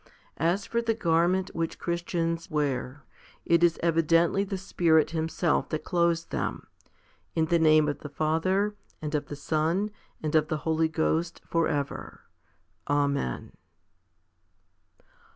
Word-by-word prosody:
As 175 +6 +1
for 235 - -1
the 230 -1 0
garment 175 0 +1
which 165 -1 -2
Christians 170 0 -2
wear, 145 -3 -2 0.4
it 170 0 +3
is 170 -1 +4
evidently 165 +3 +3
the 195 -1 -4
Spirit 165 -5 +2
Himself 160 +1 0
that 155 -1 -3
clothes 170 -1 +1
them, - - -3 0.7
in 160 - +2
the 170 +1 +2
name 155 -1 +5
of 145 - -2
the 150 - -8
Father 165 +8 +1 0.3
and 150 0 -5
of 150 - -1
the 145 - -6
Son 160 +8 0 0.3
and 155 - -2
of 155 -1 +3
the 155 - -1
Holy 160 0 +2
Ghost 160 +1 -1
for 165 -1 +1
ever. 145 -2 -4 0.7
Amen. 140 - 0
165 Hz, 135 wpm, -27 LUFS, 155-170 Hz, 0.7 s, name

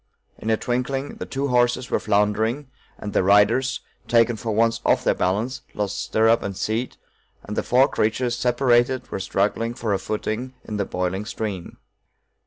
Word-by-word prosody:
In 110 - -4
a 110 - +3
twinkling 135 +4 -2
the - - -6
two 140 +1 -2
horses 120 0 +1
were - - +2
floundering, 110 +7 0 0.3
and 105 - -6
the - - +3
riders, 105 +7 +3 0.3
taken 115 0 +3
for 110 +1 -4
once 115 +1 +2
off - - +2
their - - +3
balance, 110 +8 -1
lost 105 -1 -2
stirrup 115 +1 +3
and 100 -1 -5
seat, 110 +4 -2 0.5
and 105 - -6
the - - +1
four 130 +2 +4
creatures, 120 -1 0
separated, 125 +1 +2
were - - -3
struggling 105 +5 -1
for 115 -4 -1
a 95 - 0
footing 110 +4 -3
in 105 - -5
the 100 - 0
boiling 90 +3 -2
stream. 105 -6 -5
115 Hz, 170 wpm, -23 LUFS, 105-125 Hz, 0.5 s, four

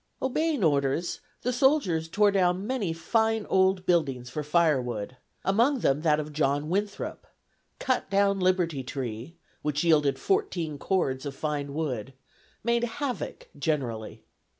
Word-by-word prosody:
Obeying 295 -1 0
orders, 145 +2 +1 0.2
the 250 - 0
soldiers 240 - +2
tore 205 +3 +4
down 185 0 +2
many 225 -7 -1
fine 220 +6 +1
old 190 -1 +3
buildings 135 -8 +1
for 150 - -3
firewood, 130 -8 +1 0.3
among 235 +7 +3
them 140 +2 +2
that 155 -2 +3
of 150 0 -5
John 145 0 0
Winthrop; 200 +3 -3 0.5
cut 260 -2 -1
down 200 0 +3
Liberty 180 -6 +1
Tree, 130 +2 -5 0.3
which 150 0 -1
yielded 150 -5 +3
fourteen 175 - -1
cords 135 -9 0
of 140 -1 -5
fine 145 -2 -3
wood; 135 -6 -3 0.5
made 235 +1 +1
havoc 280 - -4
generally. 125 -9 -3
165 Hz, 130 wpm, -27 LUFS, 140-205 Hz, 0.5 s, tore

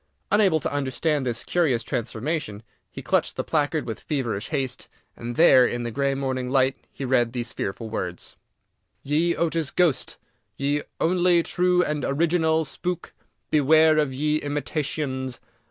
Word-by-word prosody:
Unable 195 -6 +4
to - - -3
understand 140 +1 -1
this 120 -1 -3
curious 150 -10 +1
transformation, 120 -2 -3 0.3
he - - -9
clutched - - +1
the - - -2
placard 150 0 0
with 115 - -5
feverish 120 -8 -3
haste, 135 -5 -3 0.3
and 120 +1 -6
there, 130 -5 +7
in 120 -1 -1
the 120 - -3
grey 140 +2 0
morning 130 -2 -2
light, 130 0 +2 0.2
he 135 - -6
read 120 -2 +2
these 120 -1 -4
fearful 110 +4 -4
words: 90 -5 -5 0.3
+ - - -51
+ - - -50
| - - -47
YE 160 +4 +1
OTIS 165 -3 0
GHOSTE 175 -7 +1
| - - -44
| - - -48
Ye 145 +1 0 0.2
Onlie 175 0 +3
True 180 +1 +2
and 150 -3 -2
Originale 160 +1 +1
Spook, 175 +4 -4
| - - -45
| - - -49
Beware 155 +1 +5
of 150 -3 +1
Ye 150 +3 0
Imitationes. 145 -3 -3
145 Hz, 170 wpm, -24 LUFS, 130-160 Hz, 0.3 s, there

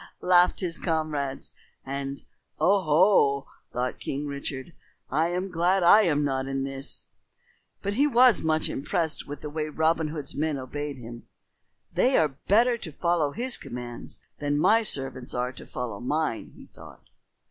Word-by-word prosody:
laughed 180 +1 +4
his 175 -2 0
comrades, 155 -5 -2 0.3
and 140 0 -4 0.4
"O 190 +6 +4
ho!" 150 -4 +3 0.2
thought 125 +1 -3
King 140 +2 -4
Richard, 140 +1 -5 0.4
"I 155 +5 +2
am 180 +2 -3
glad 180 +2 +2
I 205 +5 +8
am 150 -7 +2
not 135 -1 -1
in 135 0 -2
this." 135 +1 -2 0.8
But 200 - -1
he 280 +7 +3
was 250 -4 +5
much 155 0 +1
impressed 160 +2 -2
with 145 0 -7
the 150 - -5
way 155 0 -3
Robin 160 +1 +1
Hood's 150 -2 -5
men 155 -1 -1
obeyed 145 +2 -5
him. 120 -1 -10 0.7
"They 260 +1 +3
are 145 -3 +1
better 235 +4 +4
to 160 - -6
follow 170 -1 0
his 240 - -1
commands 120 -1 -7 0.2
than 145 0 0
my 220 +9 +4
servants 135 - +1
are 125 +1 -1
to 130 - -12
follow 115 -5 -5
mine," 145 -1 -2
he - - -13
thought. - - -15
150 Hz, 160 wpm, -26 LUFS, 135-175 Hz, 0.8 s, I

